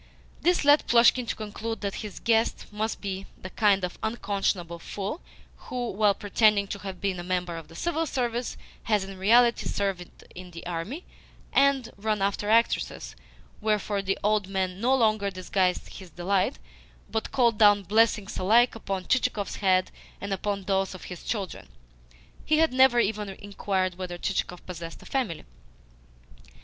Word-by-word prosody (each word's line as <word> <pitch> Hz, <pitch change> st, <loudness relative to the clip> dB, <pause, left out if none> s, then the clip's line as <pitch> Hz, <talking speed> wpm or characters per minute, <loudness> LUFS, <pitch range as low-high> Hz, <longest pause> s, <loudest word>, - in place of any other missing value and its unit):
This 350 Hz, -3 st, +2 dB
led 290 Hz, +1 st, +5 dB
Plushkin 240 Hz, +1 st, +5 dB
to -, -, -2 dB
conclude 220 Hz, +1 st, -5 dB
that 200 Hz, -1 st, -2 dB
his 210 Hz, -3 st, -7 dB
guest 225 Hz, -1 st, +1 dB
must 215 Hz, +2 st, -3 dB
be 195 Hz, -1 st, -4 dB
the 185 Hz, -, -8 dB
kind 200 Hz, -2 st, +3 dB
of 180 Hz, -, -4 dB
unconscionable 195 Hz, -6 st, -2 dB
fool 200 Hz, -, -5 dB, 0.5 s
who, 245 Hz, -2 st, -3 dB
while 205 Hz, 0 st, +3 dB
pretending 205 Hz, 0 st, +3 dB
to 200 Hz, -, -4 dB
have 190 Hz, -2 st, -7 dB
been 195 Hz, -3 st, -1 dB
a -, -, -5 dB
member 180 Hz, -1 st, -2 dB
of 165 Hz, -2 st, -8 dB
the 165 Hz, -, -15 dB
Civil 330 Hz, -, -1 dB
Service, 245 Hz, -2 st, -2 dB, 0.3 s
has 210 Hz, -3 st, +2 dB
in 190 Hz, 0 st, -9 dB
reality 235 Hz, +4 st, +4 dB
served 195 Hz, -3 st, -3 dB
in 180 Hz, 0 st, -10 dB
the 170 Hz, -1 st, -10 dB
army 180 Hz, -, -5 dB, 0.5 s
and 275 Hz, -4 st, +3 dB
run 215 Hz, +1 st, -1 dB
after 200 Hz, +1 st, -1 dB
actresses; 220 Hz, -, +1 dB, 0.5 s
wherefore 210 Hz, -1 st, 0 dB
the 195 Hz, 0 st, -1 dB
old 210 Hz, -2 st, +2 dB
man 190 Hz, -1 st, -2 dB
no 255 Hz, +3 st, +3 dB
longer 215 Hz, -5 st, +2 dB
disguised 185 Hz, 0 st, -1 dB
his 190 Hz, -3 st, -11 dB
delight, 185 Hz, +4 st, 0 dB, 0.5 s
but 220 Hz, -, -2 dB
called 240 Hz, -5 st, +2 dB
down 205 Hz, -2 st, +6 dB
blessings 215 Hz, 0 st, +2 dB
alike 230 Hz, +6 st, +4 dB
upon 195 Hz, -4 st, -4 dB
Chichikov's 210 Hz, -6 st, 0 dB
head 185 Hz, -2 st, +2 dB, 0.3 s
and 200 Hz, 0 st, -3 dB
upon 200 Hz, +1 st, -2 dB
those 195 Hz, 0 st, 0 dB
of 185 Hz, -, -10 dB
his 175 Hz, -, -11 dB
children 200 Hz, -6 st, -4 dB, 0.8 s
(he 310 Hz, -, +2 dB
had 320 Hz, -3 st, +3 dB
never 260 Hz, -2 st, +5 dB
even 210 Hz, -2 st, 0 dB
inquired 190 Hz, -2 st, -2 dB
whether 180 Hz, -1 st, -5 dB
Chichikov 180 Hz, -1 st, -3 dB
possessed 170 Hz, -2 st, -8 dB
a -, -, -15 dB
family). 240 Hz, -, -2 dB
200 Hz, 160 wpm, -27 LUFS, 185-225 Hz, 0.8 s, down